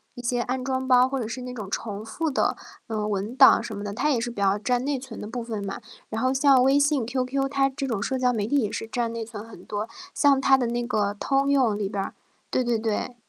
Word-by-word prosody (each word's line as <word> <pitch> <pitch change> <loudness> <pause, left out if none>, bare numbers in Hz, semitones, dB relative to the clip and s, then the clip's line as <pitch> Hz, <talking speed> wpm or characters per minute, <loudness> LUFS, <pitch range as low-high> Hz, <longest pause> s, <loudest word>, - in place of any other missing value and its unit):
一 245 - -7
些 245 0 0
安 255 +1 -2
装 260 0 -2
包， 255 0 +6
或 270 0 -2
者 230 - -3
是 245 +3 -5
那 250 0 -6
种 210 -5 -6
重 210 -1 -4
复 320 +7 -2
的， 265 - +1 0.3
嗯， 215 -2 -2
文 205 +4 -2
档 265 -3 +7
什 220 -3 -6
么 205 - -5
的， 205 -1 -4
它 295 +8 0
也 265 -5 +2
是 240 - -2
比 235 - -15
较 195 0 +3
占 245 +3 0
内 285 -1 0
存 250 -3 -9
的 - - -6
部 240 +3 -4
分 220 -3 -4
嘛。 195 - -5 0.3
然 220 +1 -3
后 255 0 +2
像 270 -1 +5
微 270 +2 +4
信、 285 -4 +2
QQ， 260 +2 -1
它 275 -1 +3
这 275 +1 -4
种 225 -6 -2
社 265 - -1
交 250 -1 +3
媒 210 -3 -1
体 285 - +2
也 215 -5 -1
是 225 - -4
占 230 0 -2
内 230 -1 -3
存 215 -2 -8
很 225 - -13
多， 210 +1 -3 0.3
像 280 -2 +4
它 270 0 +5
的 250 -2 0
那 240 +1 -2
个 205 -4 0
通 275 +5 +1
用 255 -7 +3
里 205 -2 -2
边 200 -1 -2
儿 - - -6 0.4
对 255 - +1
对 240 -1 +1
对。 220 +2 -2
245 Hz, 295 characters per minute, -25 LUFS, 215-265 Hz, 0.4 s, 档